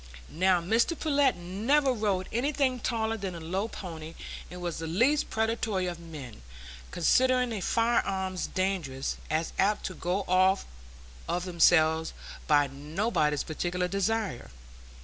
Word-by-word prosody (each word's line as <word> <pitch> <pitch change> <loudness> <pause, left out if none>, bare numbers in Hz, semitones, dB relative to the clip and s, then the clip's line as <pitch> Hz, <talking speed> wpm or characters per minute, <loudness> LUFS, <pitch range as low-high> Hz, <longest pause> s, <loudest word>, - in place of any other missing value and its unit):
Now, 185 +1 +3
Mr 230 - +1
Pullet 285 -4 +3
never 225 +11 +1
rode 200 -5 -1
anything 260 +1 +1
taller 225 -1 -1
than 195 -4 -4
a - - -6
low 185 +6 -2
pony, 165 -7 -8 0.3
and 180 - -8
was 175 -2 -4
the 165 - -4
least 235 - +2
predatory 220 -3 0
of 175 -2 -4
men, 150 - -9 0.5
considering 250 +3 +2
firearms 190 -4 0
dangerous, 180 -9 -2
as 160 +2 -1
apt 205 +2 +2
to 185 - -3
go 180 +3 -1
off 185 +1 +3 0.6
of 175 +1 -1
themselves 160 -2 +3 0.3
by 145 -2 +5
nobody's 150 - -1
particular 175 +3 -2
desire. 200 - -1
185 Hz, 130 wpm, -29 LUFS, 170-225 Hz, 0.6 s, by